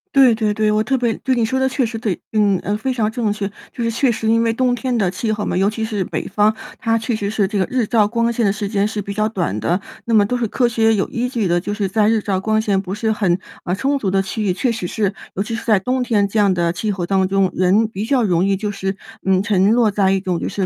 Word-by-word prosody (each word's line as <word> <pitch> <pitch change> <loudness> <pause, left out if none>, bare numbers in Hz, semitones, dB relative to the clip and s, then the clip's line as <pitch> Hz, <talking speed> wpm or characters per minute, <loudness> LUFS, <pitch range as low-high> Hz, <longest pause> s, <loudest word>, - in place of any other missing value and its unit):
对 265 -3 +7
对 220 -1 0
对， 215 0 +2
我 215 0 +2
特 265 +3 0
别 235 -3 0
对， 260 -1 0
你 230 -2 +2
说 260 +4 -1
得 265 0 +2
确 260 -1 0
实 225 0 -5
对， 210 -7 -2
嗯， 205 -3 +3 0.2
非 260 +4 -1
常 225 -4 0
正 220 -2 -1
确， 205 -1 -2 0.2
就 240 - -5
是 230 - 0
确 245 +3 +2
实 225 -1 -3
因 230 +1 +3
为 230 0 +2
冬 250 +2 +1
天 245 +1 -1
的 195 -5 +1
气 215 +3 -2
候 210 -1 -2
嘛， - - -2
尤 195 +2 +3
其 220 +1 -3
是 210 -4 -2
北 - - -4
方， 210 +2 +2 0.2
它 225 -1 +1
确 225 +1 -2
实 205 -2 -2
是 205 -2 +1
这 205 0 -2
个 190 - +2
日 250 -3 0
照 215 -1 +3
光 230 +2 0
线 235 - 0
的 200 - +3
时 205 0 -3
间 200 -1 +1
是 210 -2 -4
比 200 - -5
较 215 +1 0
短 175 - -2
的。 170 - 0 0.3
那 230 - +1
么 205 -2 +5
都 250 +5 -1
是 240 -2 0
科 245 +3 +1
学 225 -1 +2
有 195 - 0
依 245 +1 -2
据 230 -6 -1
的， 175 0 +1
就 205 +3 -3
是 205 -2 -1
在 210 +2 +2
日 225 -1 +2
照 195 -2 -1
光 215 +2 +1
线 200 -3 +1
不 190 +1 -5
是 220 +1 0
很， 195 -5 +1 0.3
啊， 180 - -1
充 275 +6 0
足 200 - -1
的 195 +1 +2
区 205 +3 -4
域， 205 -3 +1
确 235 +7 0
实 215 -6 -3
是 200 0 -1 0.2
尤 195 - 0
其 230 - -6
是 225 - -4
在 215 -4 +3
冬 255 +7 -1
天 210 -5 +1
这 215 +2 -1
样 200 -2 +4
的 170 -1 0
气 210 +4 -2
候 185 -3 -3
当 190 0 +1
中， 195 -1 +1
人 190 +5 +3
比 210 -2 -5
较 250 +2 +1
容 180 -4 +2
易 195 0 +1
就 205 +1 -3
是， 195 -1 -3 0.3
嗯， 190 0 +2
沉 200 -1 +3
落 230 -3 +3
在 195 -2 +2
一 195 - +2
种 185 -2 -2
就 - - -3
是 195 - -2
215 Hz, 320 characters per minute, -19 LUFS, 195-230 Hz, 0.3 s, 对